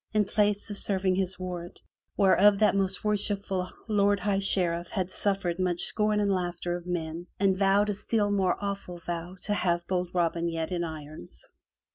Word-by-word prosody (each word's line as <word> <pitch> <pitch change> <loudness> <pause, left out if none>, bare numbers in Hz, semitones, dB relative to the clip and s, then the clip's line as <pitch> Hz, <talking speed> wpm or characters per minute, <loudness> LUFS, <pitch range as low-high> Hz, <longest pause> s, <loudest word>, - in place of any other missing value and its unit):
in 210 -1 +4
place 205 +1 +1
of 205 - -5
serving 190 -2 +1
his 190 0 -1
warrant, 180 -1 -6 0.4
whereof 200 +1 +5
that 210 -1 +3
most 195 -1 0
worshipful 200 -3 -1 0.2
Lord 205 -2 +3
High 200 -1 +1
Sheriff 175 -3 +1
had 185 -3 -2
suffered 190 -4 -1
much 180 -2 0
scorn 210 -1 +1
and 205 -1 +2
laughter 175 -1 -2
of 175 0 -8
men, 170 0 -3
and 195 -1 +3
vowed 200 +2 +3
a - - -1
still 205 +1 0
more 190 -3 +2
awful 200 -3 -4
vow 170 +1 -5
to 210 - 0
have 175 -3 0
bold 180 -1 -1
Robin 170 -1 0
Hood 170 - -1
yet 165 +1 -3
in 175 -1 -1
irons! 155 - -8
190 Hz, 180 wpm, -28 LUFS, 175-200 Hz, 0.4 s, whereof